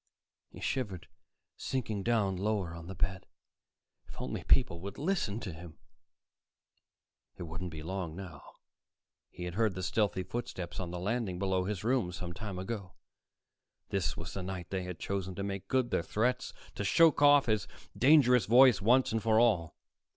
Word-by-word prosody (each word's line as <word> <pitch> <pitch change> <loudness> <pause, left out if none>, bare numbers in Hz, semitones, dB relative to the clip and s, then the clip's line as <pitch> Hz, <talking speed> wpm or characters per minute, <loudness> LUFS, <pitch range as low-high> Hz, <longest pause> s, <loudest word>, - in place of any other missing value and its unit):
He - - -12
shivered, 105 -10 -3 0.5
sinking 110 -6 -3
down 105 -3 +1
lower 100 -3 -1
on 85 0 -9
the 95 - -7
bed. 95 +1 -2 0.8
If - - -12
only - - -4
people 85 -10 +3
would 100 +1 -7
listen 145 - -1
to 95 - -5
him 80 0 -11 1.6
It - - -6
wouldn't 85 +2 -5
be 80 -2 -8
long 90 -2 -4
now. 95 -3 -8 0.9
He 90 - -9
had 90 -1 -4
heard 110 -1 +1
the 95 - -4
stealthy 95 0 0
footsteps 95 -3 -5
on 90 -2 -3
the 90 - -5
landing 100 0 -2
below 95 -1 0
his 100 -2 -3
room 120 -6 +1
some 85 0 -6
time 100 0 -6
ago. 95 -1 -5 1.0
This 95 -5 -1
was 80 -1 -6
the 100 - -4
night 90 -2 -6
they 95 -1 -2
had 90 -2 -6
chosen 95 0 -3
to 100 - -4
make 100 -1 -4
good 130 -2 +1
their - - +2
threats, 120 +8 -1 0.2
to - - -4
choke 155 +10 +4
off 145 -1 +7
his 110 -6 0 0.3
dangerous 130 -3 +5
voice 125 -1 +7
once 125 +5 +4
and 110 0 0
for 110 0 +3
all. 100 -9 +2
100 Hz, 170 wpm, -31 LUFS, 90-115 Hz, 1.6 s, off